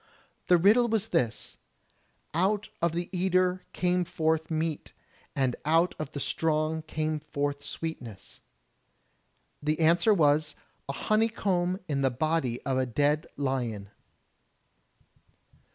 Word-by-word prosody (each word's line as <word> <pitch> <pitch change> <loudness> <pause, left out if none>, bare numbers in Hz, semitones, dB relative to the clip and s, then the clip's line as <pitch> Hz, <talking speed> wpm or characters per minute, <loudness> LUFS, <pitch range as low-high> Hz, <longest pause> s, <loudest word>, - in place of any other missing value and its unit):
The 180 - +6
riddle 215 +8 +5
was 225 -1 0
this: 115 -3 -1 0.8
"Out 200 +6 +1
of 170 -1 +1
the 175 +1 -2
eater 185 0 +1
came 180 0 +1
forth 160 -1 0
meat, 160 -1 -2 0.4
and 130 -3 +1
out 165 +4 +3
of 155 -3 -4
the 145 - -4
strong 155 +1 0
came 155 0 -2
forth 145 -1 -3
sweetness.*' 125 -11 -7 1.2
The 150 +2 0
answer 170 +6 +4
was, 150 -4 +3 0.3
"A - - -1
honeycomb 195 -2 +1
in 140 -3 -1
the 135 - +3
body 130 -2 -1
of 130 -1 0
a 130 - 0
dead 145 +5 +1
lion." 120 -7 -2
155 Hz, 120 wpm, -28 LUFS, 145-180 Hz, 1.2 s, The